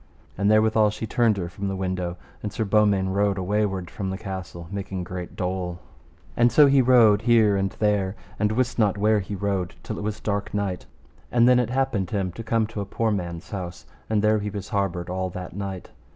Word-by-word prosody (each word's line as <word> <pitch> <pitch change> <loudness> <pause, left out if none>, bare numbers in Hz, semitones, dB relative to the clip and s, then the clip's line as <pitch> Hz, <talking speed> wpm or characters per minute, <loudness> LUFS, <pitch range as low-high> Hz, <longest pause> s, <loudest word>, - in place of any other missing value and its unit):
And 100 +1 +1
therewithal 110 0 +4
she 105 +2 -5
turned 115 -2 +2
her 90 -3 -2
from 100 +3 -5
the 95 - -2
window, 90 -2 -3 0.2
and 105 - -4
Sir 110 - -2
Beaumains 100 -2 +3
rode 100 0 +1
awayward 95 -2 -1
from 95 -2 -4
the 95 - -3
castle, 95 -4 -7
making 95 -2 -4
great 90 0 -7
dole, 90 -2 -3 0.6
and 120 0 +4
so 150 +5 +7
he 140 -1 +5
rode 115 -5 +5
here 110 -3 +4
and 95 0 +1
there 105 -2 0 0.2
and 105 0 +2
wist 120 +2 0
not 105 -3 +3
where 105 +1 +3
he 100 +1 -5
rode, 95 -2 -2
till - - -5
it - - -5
was 105 0 -3
dark 100 -1 -2
night. 100 -3 -2 0.4
And 120 0 +5
then 125 0 +6
it 120 -2 0
happened 125 -8 0
him 95 -3 -1
to 90 - -8
come 115 0 +1
to 105 -1 -5
a - - -3
poor 115 +2 0
man's 85 -4 -4
house, 90 -3 -6 0.2
and 110 -1 +1
there 110 0 +4
he 105 0 -3
was 100 0 -6
harboured 95 -5 -1
all 95 0 -2
that 90 -1 -7
night. 95 -2 -5
100 Hz, 210 wpm, -24 LUFS, 95-110 Hz, 0.6 s, so